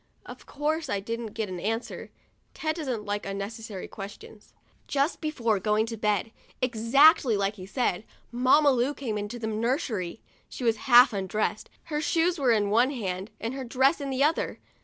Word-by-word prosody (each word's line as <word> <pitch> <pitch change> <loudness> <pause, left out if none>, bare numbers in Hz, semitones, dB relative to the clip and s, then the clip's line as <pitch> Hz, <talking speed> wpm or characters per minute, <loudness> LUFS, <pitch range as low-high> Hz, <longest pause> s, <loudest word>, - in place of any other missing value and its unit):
Of - - -11
course, 305 +1 -2
I 200 - 0
didn't 230 +1 -5
get 220 -2 -2
an 185 -2 -6
answer. 225 +6 -4 0.5
Ted 315 +1 -2
doesn't 255 -9 -3
like 205 0 -2
unnecessary 200 +1 -6
questions. 205 +1 -11 0.4
Just 285 +3 0
before 235 - 0
going 210 +2 +1
to 225 0 -5
bed, 210 0 0 0.3
exactly 250 - +4
as 200 +1 0
he 185 -2 -10
said, 210 -3 -1 0.3
Mamma 260 +4 +4
Lu 260 +3 +1
came 235 -6 -4
into 210 +3 -4
the 230 - -5
nursery. 220 - -2 0.3
She - - -7
was 230 -2 +2
half 245 0 +8
undressed, 205 +2 -2
her 300 -2 -3
shoes 335 +2 +1
were 260 -4 +3
in 205 -3 +2
one 240 +4 +4
hand, 195 -7 -4
and 230 +2 -3
her 265 0 -5
dress 265 +5 +2
in 280 - -3
the 265 +1 +1
other. 310 +3 0
230 Hz, 175 wpm, -27 LUFS, 210-275 Hz, 0.5 s, half